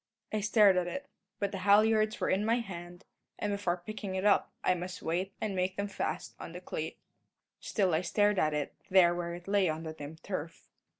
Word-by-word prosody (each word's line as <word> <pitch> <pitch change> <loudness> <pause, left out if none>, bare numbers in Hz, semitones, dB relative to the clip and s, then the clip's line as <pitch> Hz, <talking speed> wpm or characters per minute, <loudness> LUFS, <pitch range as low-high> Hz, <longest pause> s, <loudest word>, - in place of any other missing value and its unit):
I 215 - +1
stared 210 -2 +5
at 180 -1 +1
it; 280 +10 -4 0.3
but 200 -1 -1
the 195 - -4
halliards 215 +2 +4
were - - +1
in 195 +2 +2
my 225 +2 +3
hand, 175 -5 -6 0.3
and 205 - -1
before 180 -3 -1
picking 210 -2 -5
it 190 +1 -1
up 205 - +4
I - - +4
must 180 +1 -6
wait 180 +4 -1
and 210 -3 -2
make 185 +1 0
them 200 0 -1
fast 180 -4 -3
on 165 - -8
the 180 - -6
cleat. 160 -3 -5 0.6
Still 190 -5 +1
I 160 - +3
stared 205 +2 +2
at 155 -1 +2
it, 150 -1 -2 0.2
there 185 -2 +6
where 170 0 -3
it 175 +1 -11
lay 200 -3 +3
on 155 +1 -3
the 160 -1 -5
dim 150 0 -8
turf. 165 -4 -5
185 Hz, 215 wpm, -31 LUFS, 175-205 Hz, 0.6 s, there